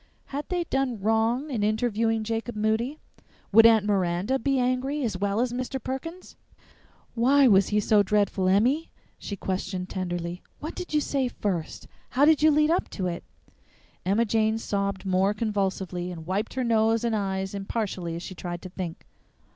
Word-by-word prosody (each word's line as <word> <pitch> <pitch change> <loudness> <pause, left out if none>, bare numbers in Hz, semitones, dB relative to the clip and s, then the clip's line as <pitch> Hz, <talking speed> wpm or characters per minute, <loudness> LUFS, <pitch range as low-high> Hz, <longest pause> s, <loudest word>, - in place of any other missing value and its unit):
Had 290 +2 -4
they 355 -1 0
done 270 -7 -1
wrong 225 +7 +1
in 230 -5 -1
interviewing 225 +1 +1
Jacob 225 +1 -3
Moody? 220 +7 0 0.5
Would 225 +3 +8
Aunt 220 -3 +4
Miranda 195 +5 +1
be 275 +3 +1
angry, 255 +3 0
as 225 -5 -1
well 200 +3 -1
as 245 0 0
Mr. 255 +2 -3
Perkins? 330 +9 -6 0.8
"Why 265 +4 +4
was 195 -4 +5
he 210 - +1
so 210 0 +4
dreadful, 200 -2 +1
Emmy?" 250 +12 +2 0.3
she 200 - -5
questioned 185 0 -3
tenderly. 175 -1 -4 0.2
"What 310 - -5
did 360 - -7
you 300 - +4
say 275 -3 0
first? 190 -9 -4 0.2
How 275 +3 +3
did 310 -1 +5
you 310 - +6
lead 305 +1 +3
up 350 - 0
to 190 - -4
it?" 170 -1 -3 0.8
Emma 205 +5 +2
Jane 220 0 +1
sobbed 200 -3 -2
more 190 +2 +2
convulsively, 190 -4 -2
and 165 -2 -8
wiped 200 +7 -2
her 260 - 0
nose 225 -1 +2
and 230 -2 +1
eyes 190 -1 -2
impartially 195 -4 -3
as 170 - -6
she 185 - -7
tried 175 -1 -6
to 185 - -7
think. 180 -3 -6
215 Hz, 170 wpm, -26 LUFS, 190-250 Hz, 0.8 s, Would